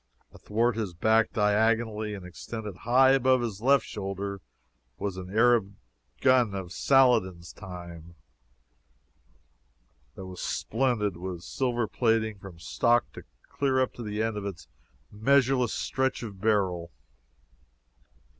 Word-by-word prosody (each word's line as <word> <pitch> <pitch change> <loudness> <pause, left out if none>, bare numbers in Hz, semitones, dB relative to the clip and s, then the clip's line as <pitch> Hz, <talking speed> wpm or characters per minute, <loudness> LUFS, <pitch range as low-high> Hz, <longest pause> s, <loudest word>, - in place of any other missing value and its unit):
Athwart 115 +2 0
his 100 -6 -3
back, 110 +5 +3
diagonally, 110 0 +1
and 95 -3 -9
extending 105 +3 -7
high 125 +7 +4
above 130 -1 +3
his 110 -4 -4
left 135 +3 +4
shoulder, 100 -1 -5 0.6
was 100 -2 -3
an 95 -1 -7
Arab 110 -2 +3 0.5
gun 125 -6 +4
of 95 -3 -6
Saladin's 110 - +2
time, 85 -3 -10 2.0
that 95 - -8
was 90 -1 -8
splendid 110 -6 -1
with 90 -1 -6
silver 120 0 -1
plating 110 -3 0
from 95 -3 -11
stock 120 +7 +1 0.3
clear 135 -2 0
up 130 - 0
to - - -9
the 105 -1 -2
end 110 -1 -2
of 100 - -5
its 95 -6 -8 0.4
measureless 125 +2 +2
stretch 130 -1 -1
of 100 -4 -8
barrel. 95 -6 0
110 Hz, 120 wpm, -27 LUFS, 95-120 Hz, 2.0 s, high